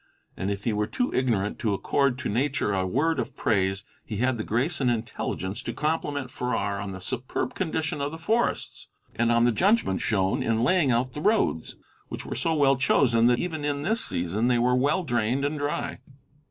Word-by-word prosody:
And 95 Hz, -, -3 dB
if 100 Hz, 0 st, -3 dB
he 115 Hz, -, 0 dB
were 105 Hz, 0 st, 0 dB
too 250 Hz, -, -1 dB
ignorant 115 Hz, -6 st, 0 dB
to 105 Hz, -3 st, 0 dB
accord 140 Hz, +5 st, +1 dB
to 130 Hz, -, -4 dB
nature 115 Hz, -2 st, 0 dB
a 95 Hz, -1 st, 0 dB
word 150 Hz, -, +1 dB
of -, -, -4 dB
praise, 95 Hz, -2 st, +1 dB, 0.2 s
he 105 Hz, -, -5 dB
had 125 Hz, +1 st, +1 dB
the -, -, -1 dB
grace 140 Hz, +9 st, 0 dB
and 125 Hz, -, +3 dB
intelligence 110 Hz, -2 st, -3 dB
to -, -, -5 dB
compliment 145 Hz, -4 st, -2 dB
Farrar 100 Hz, -6 st, -2 dB
on 100 Hz, -, -4 dB
the 95 Hz, 0 st, -6 dB
superb 130 Hz, -, -3 dB
condition 160 Hz, -6 st, -2 dB
of 140 Hz, -, 0 dB
the 160 Hz, -, -6 dB
forests, 225 Hz, +8 st, -1 dB, 0.3 s
and 115 Hz, 0 st, +2 dB
on 115 Hz, 0 st, +4 dB
the 120 Hz, -, +4 dB
judgment 190 Hz, -, +2 dB
shown 95 Hz, -3 st, +1 dB
in 115 Hz, 0 st, +1 dB
laying 160 Hz, +1 st, +3 dB
out 125 Hz, +1 st, +1 dB
the 150 Hz, -, -5 dB
roads, 210 Hz, -, +1 dB, 0.3 s
which -, -, -7 dB
were -, -, -4 dB
so 165 Hz, -1 st, 0 dB
well 140 Hz, -3 st, +4 dB
chosen 120 Hz, -3 st, +3 dB
that 120 Hz, 0 st, +4 dB
even 160 Hz, -2 st, -3 dB
in 145 Hz, -1 st, -1 dB
this 220 Hz, +7 st, +1 dB
season 90 Hz, +6 st, -1 dB
they 125 Hz, -1 st, +3 dB
were 125 Hz, +1 st, +2 dB
well 145 Hz, +8 st, +2 dB
drained 120 Hz, 0 st, 0 dB
and 145 Hz, +1 st, -2 dB
dry. 145 Hz, 0 st, -2 dB
125 Hz, 205 wpm, -26 LUFS, 110-145 Hz, 0.3 s, on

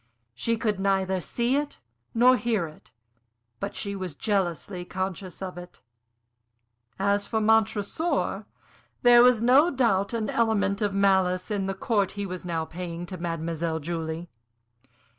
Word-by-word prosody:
She 230 Hz, -, -1 dB
could 215 Hz, -3 st, -1 dB
neither 190 Hz, -1 st, +1 dB
see 240 Hz, -, 0 dB
it 290 Hz, 0 st, -3 dB, 0.4 s
nor 250 Hz, +2 st, +6 dB
hear 230 Hz, -7 st, 0 dB
it, 155 Hz, -1 st, -14 dB, 0.7 s
but -, -, -4 dB
she 200 Hz, -1 st, -4 dB
was 185 Hz, -5 st, -5 dB
jealously 180 Hz, -, -1 dB
conscious 185 Hz, 0 st, -5 dB
of 180 Hz, -2 st, -6 dB
it. 175 Hz, 0 st, -13 dB, 1.1 s
As 200 Hz, +1 st, +1 dB
for 220 Hz, -, 0 dB
Montresor, 220 Hz, -, +1 dB, 0.6 s
there 240 Hz, -1 st, +8 dB
was 245 Hz, -2 st, +5 dB
no 270 Hz, +7 st, +6 dB
doubt 230 Hz, -, +1 dB
an 220 Hz, -2 st, -1 dB
element 220 Hz, -3 st, +1 dB
of 205 Hz, -2 st, 0 dB
malice 190 Hz, -1 st, +2 dB
in 195 Hz, -2 st, -1 dB
the 195 Hz, -, -2 dB
court 200 Hz, -1 st, 0 dB
he 205 Hz, -1 st, -4 dB
was 185 Hz, -1 st, -6 dB
now 165 Hz, -2 st, -2 dB
paying 175 Hz, 0 st, -6 dB
to 185 Hz, +1 st, -7 dB
Mademoiselle 165 Hz, -1 st, -2 dB
Julie. 165 Hz, +1 st, -4 dB
195 Hz, 140 wpm, -26 LUFS, 180-220 Hz, 1.1 s, there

